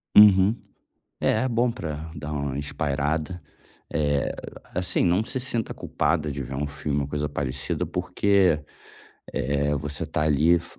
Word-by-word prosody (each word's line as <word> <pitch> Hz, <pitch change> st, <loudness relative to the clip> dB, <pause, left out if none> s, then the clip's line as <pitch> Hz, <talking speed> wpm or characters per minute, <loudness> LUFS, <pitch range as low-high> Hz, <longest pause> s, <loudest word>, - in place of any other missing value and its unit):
Uhum. 105 Hz, 0 st, +8 dB, 0.7 s
É, 110 Hz, -, +3 dB
é -, -, +1 dB
bom 120 Hz, 0 st, +2 dB
para 80 Hz, -8 st, -5 dB
dar 75 Hz, 0 st, -5 dB
uma 70 Hz, -2 st, -2 dB
espairada. 75 Hz, +4 st, -1 dB, 0.5 s
Eh, 70 Hz, -2 st, +1 dB, 0.4 s
assim, 90 Hz, 0 st, +1 dB
não 90 Hz, +4 st, +3 dB
se 130 Hz, -, -4 dB
sinta 120 Hz, -3 st, -2 dB
culpada 75 Hz, -3 st, 0 dB
de 70 Hz, 0 st, -4 dB
ver 65 Hz, +1 st, -5 dB
um 75 Hz, +2 st, -1 dB
filme 70 Hz, 0 st, -2 dB
ou 70 Hz, -, -2 dB
coisa 75 Hz, 0 st, -2 dB
parecida, 70 Hz, -2 st, -2 dB
porque, 100 Hz, -6 st, +2 dB, 0.7 s
eh, 70 Hz, +2 st, 0 dB
você 75 Hz, +2 st, -3 dB
tá 75 Hz, 0 st, -1 dB
ali 75 Hz, +2 st, +4 dB
f 85 Hz, -, -4 dB
75 Hz, 150 wpm, -25 LUFS, 70-90 Hz, 0.7 s, Uhum